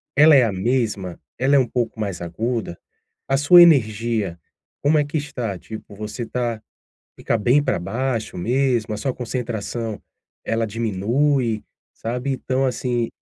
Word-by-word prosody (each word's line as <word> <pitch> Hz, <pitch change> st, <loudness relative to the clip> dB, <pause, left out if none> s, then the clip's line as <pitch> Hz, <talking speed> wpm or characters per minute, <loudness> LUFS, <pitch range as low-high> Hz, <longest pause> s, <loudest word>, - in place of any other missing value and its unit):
Ela 150 Hz, +1 st, +7 dB
é 130 Hz, -, +7 dB
a 115 Hz, -, +1 dB
mesma? 100 Hz, -3 st, -1 dB, 0.2 s
Ela 135 Hz, +2 st, +3 dB
é -, -, +7 dB
um 130 Hz, -, +2 dB
pouco 115 Hz, -2 st, -2 dB
mais 100 Hz, -5 st, -3 dB
aguda? 110 Hz, +2 st, -3 dB, 0.5 s
A 135 Hz, -, +2 dB
sua 175 Hz, +5 st, +8 dB
energia, 110 Hz, -, +2 dB, 0.5 s
como 150 Hz, +2 st, +4 dB
é 145 Hz, -, +1 dB
que 145 Hz, +2 st, -3 dB
está? 125 Hz, -9 st, -4 dB
Tipo, 110 Hz, -2 st, -10 dB
você 105 Hz, +3 st, -5 dB
tá 120 Hz, -2 st, -3 dB, 0.6 s
fica 115 Hz, -, -1 dB
bem 125 Hz, +7 st, +3 dB
para -, -, 0 dB
baixo 115 Hz, +5 st, -3 dB
mesmo, 120 Hz, +1 st, +1 dB
a -, -, -3 dB
sua 130 Hz, +3 st, -2 dB
concentração, 115 Hz, -2 st, -4 dB, 0.4 s
ela 115 Hz, 0 st, 0 dB
diminui, 115 Hz, +3 st, 0 dB, 0.3 s
sabe. 125 Hz, +4 st, -3 dB
Então, 130 Hz, +1 st, -1 dB
assim 120 Hz, -2 st, -1 dB
120 Hz, 150 wpm, -22 LUFS, 110-130 Hz, 0.6 s, sua